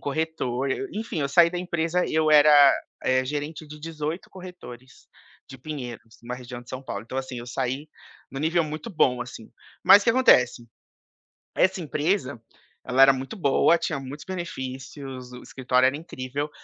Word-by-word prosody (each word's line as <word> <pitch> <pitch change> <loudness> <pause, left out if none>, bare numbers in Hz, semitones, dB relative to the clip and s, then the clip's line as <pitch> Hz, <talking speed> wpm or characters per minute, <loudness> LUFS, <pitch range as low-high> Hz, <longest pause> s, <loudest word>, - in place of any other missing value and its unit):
corretor, 140 -4 -2
eu 200 +8 -2
enfim, 215 -6 -4
eu 140 - 0
saí 170 +4 +5
da 180 - -4
empresa, 175 0 -1
eu 155 0 +2
era, 150 0 +7 0.5
eh, 130 0 +2
gerente 150 +3 -5
de 150 +1 -11
18 160 +1 -5
corretores, 180 -10 -12 0.4
de 135 - -10
Pinheiros, 120 -6 -8
uma 125 +1 -4
região 125 -1 -9
de 120 - -23
São 130 +1 -6
Paulo, 100 -6 -5
então, 130 - -7
assim, 130 -2 -5
eu 120 - -8
saí 130 +3 -3 0.5
em - - -8
um - - -3
nível 165 +2 +1
muito 155 +9 -6
bom, 125 - +2
assim. 120 -2 -11 0.4
Mas 205 - +8
o - - -8
que - - +4
acontece? 125 - +4 0.9
Essa 190 - +2
empresa, 150 - -1 0.4
ela 130 +1 +2
era 135 0 +8
muito 135 +8 -6
boa, 170 +1 +3
tinha 155 -3 -3
muitos 135 +3 -9
benefícios, 135 -7 -7
o 125 - -9
escritório 125 -1 +1
era 135 - 0
incrível, 145 -2 -5
140 Hz, 175 wpm, -25 LUFS, 130-165 Hz, 0.9 s, Mas